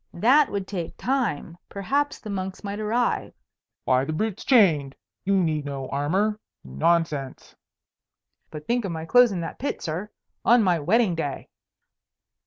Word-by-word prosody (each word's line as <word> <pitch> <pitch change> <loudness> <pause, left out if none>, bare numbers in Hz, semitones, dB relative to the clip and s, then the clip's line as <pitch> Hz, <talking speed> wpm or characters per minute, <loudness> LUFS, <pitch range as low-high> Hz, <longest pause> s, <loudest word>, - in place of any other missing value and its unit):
That 260 - +4
would 200 -2 -3
take 175 -5 -5
time; 220 - -2
perhaps 280 +9 -1
the 215 - -8
monks 190 0 -5
might 200 +1 -4
arrive. 230 +3 -1 0.5
"Why, 130 0 +2
the 140 - -3
brute's 215 +4 -2
chained. 165 - +4 0.3
You 200 +1 +2
need 160 -5 0
no 135 -2 -5
armour. 190 +10 0 0.2
Nonsense!" 140 - -1 0.9
"But 150 -1 -9
think 240 +4 0
of 195 - -3
my 160 -1 -5
clothes 245 +6 +5
in 180 -3 -3
that 165 - -6
pit, 280 - -3
sir, 175 +6 -4 0.3
on 240 -1 +5
my 180 -4 +2
wedding 195 +5 +2
day." 155 -4 -4
185 Hz, 150 wpm, -25 LUFS, 155-220 Hz, 0.9 s, clothes